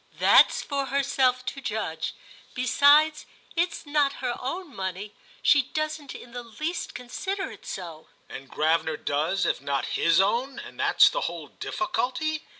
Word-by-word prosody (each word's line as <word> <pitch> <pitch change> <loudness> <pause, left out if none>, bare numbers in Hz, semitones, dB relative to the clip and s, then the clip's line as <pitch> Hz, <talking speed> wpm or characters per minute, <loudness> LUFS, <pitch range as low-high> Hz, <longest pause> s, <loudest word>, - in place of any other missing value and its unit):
"That's - - +5
for 280 -2 -2
herself 265 -2 +1
to 275 - -5
judge. 210 -9 -3 0.4
Besides, 285 +4 +4 0.3
it's 340 0 -1
not 290 -1 +2
her 250 -3 -3
own 305 +3 -5
money; 190 +2 -5 0.3
she 290 - +6
doesn't 305 +1 -4
in 240 - -11
the 245 +1 -6
least 305 +10 -5
consider 385 +11 -4
it - - -13
so." 165 -4 -7 0.2
"And 135 0 -10
Gravener 160 0 +1
does, 160 +8 0
if - - 0
not 140 -1 -1
his 165 0 +3
own; 240 +7 +1
and - - -10
that's - - +6
the - - -2
whole - - -8
difficulty?" 310 -2 -2
255 Hz, 150 wpm, -26 LUFS, 195-300 Hz, 0.4 s, she